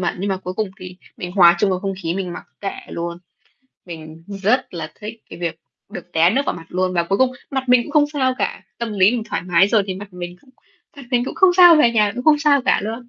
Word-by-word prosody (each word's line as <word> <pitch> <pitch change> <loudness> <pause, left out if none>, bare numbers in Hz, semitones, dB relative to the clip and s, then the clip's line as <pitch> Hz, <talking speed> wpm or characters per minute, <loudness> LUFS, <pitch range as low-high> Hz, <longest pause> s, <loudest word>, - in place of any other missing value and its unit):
mẩn, 175 - -1
nhưng 200 +2 -3
mà 190 - 0
cuối 185 0 -7
cùng 215 -2 -2
thì 185 0 -9 0.2
mình 180 0 -6
hòa 175 -3 +6
chung 200 0 +2
vào 185 - 0
không 195 -1 -3
khí, 165 +1 -2
mình 185 -2 -4
mặc - - -9 0.2
kệ 195 -1 -4
luôn. 170 0 -5 0.7
Mình 160 -1 -10 0.2
rất 235 -1 +1
là 155 -2 -6
thích 220 +1 -8
cái - - -9
việc 165 -2 -4 0.3
được 175 - -10
té 165 +2 +4
nước 270 +6 +1
vào - - 0
mặt 165 -1 -11
luôn 185 0 -1
và 170 - +2
cuối 195 +4 -1
cùng 260 -1 +3 0.2
mặt 265 -2 -3
mình 250 -1 +5
cũng 290 - -10
không 300 -2 +5
sao 260 -3 0
cả. - - -2 0.2
Tâm 235 -2 -4
lý 195 +1 +4
mình 235 -3 -2
thoải 165 - -4
mái 180 +2 +3
rồi 215 -2 +3
thì 190 - -3
mặt 200 0 -10
mình 175 0 -7
cũng 260 - -23 0.5
mặt 280 - -10
mình 245 0 +1
cũng - - -6
không 375 -1 +5
sao, 350 -3 +8
về 240 -6 +4
nhà 210 -3 +2
cũng 250 - -6
không 300 -1 +5
sao 285 -3 +3
cả - - +2
luôn. 230 +3 -6
195 Hz, 270 wpm, -20 LUFS, 175-245 Hz, 0.7 s, sao